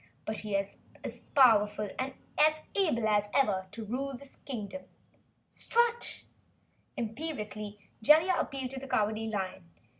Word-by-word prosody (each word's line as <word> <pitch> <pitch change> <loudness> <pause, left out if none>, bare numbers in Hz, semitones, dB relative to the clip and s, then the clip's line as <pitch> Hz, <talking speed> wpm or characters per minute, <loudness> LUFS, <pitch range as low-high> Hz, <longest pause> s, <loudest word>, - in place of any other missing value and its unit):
But 215 - -3
he 210 -2 -3
is 195 0 -2 0.2
as - - -5
powerful 210 -6 +5
and 265 +1 -1 0.6
able 305 - +2
as 210 -1 +2
ever, 195 -8 +2
to 220 +3 -7
rule 265 +5 -3
this 280 +1 -14
Kingdom! 255 +1 -6 0.6
Strut!" 475 0 0 0.7
Imperiously 215 -4 -4 0.2
Jellia 315 +10 +6
appealed 265 -2 -2
to 270 - -5
the 270 - -8
Cowardly 215 -2 +1
Lion. 190 -4 -4
225 Hz, 125 wpm, -31 LUFS, 210-275 Hz, 0.7 s, Jellia